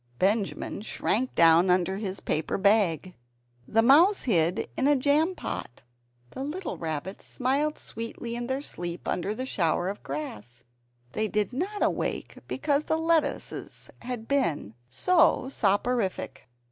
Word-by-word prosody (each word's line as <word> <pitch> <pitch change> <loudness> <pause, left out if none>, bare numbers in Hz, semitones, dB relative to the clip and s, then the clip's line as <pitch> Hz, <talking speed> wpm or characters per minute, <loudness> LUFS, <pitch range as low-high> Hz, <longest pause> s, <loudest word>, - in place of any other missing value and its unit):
Benjamin 200 - 0
shrank 240 +3 -1
down 165 +2 +6
under 180 +1 +2
his 195 -2 -4
paper 155 +1 -1
bag. 190 -4 +2 0.5
The 225 +1 +3
mouse 330 - +6
hid 175 -7 +1
in 270 - +1
a 290 - +5
jam 300 +7 +2
pot. 120 - -6 0.5
The 265 - -5
little 340 +7 -4
rabbits 160 +3 -5
smiled 280 +4 0
sweetly 230 +1 -6
in 240 0 -4
their 265 +2 -2
sleep 175 -8 -6
under 200 +4 -1
the 255 - -3
shower 175 -5 0
of 200 - -6
grass; 175 - -6 0.5
they 215 +9 0
did 210 +2 -1
not 385 +10 -2
awake - - -2
because 295 0 0
the 315 - +1
lettuces 325 0 -1
had 240 -2 -5
been 170 - 0 0.2
so 310 - +3
soporific. 205 -2 0
225 Hz, 135 wpm, -27 LUFS, 185-280 Hz, 0.5 s, down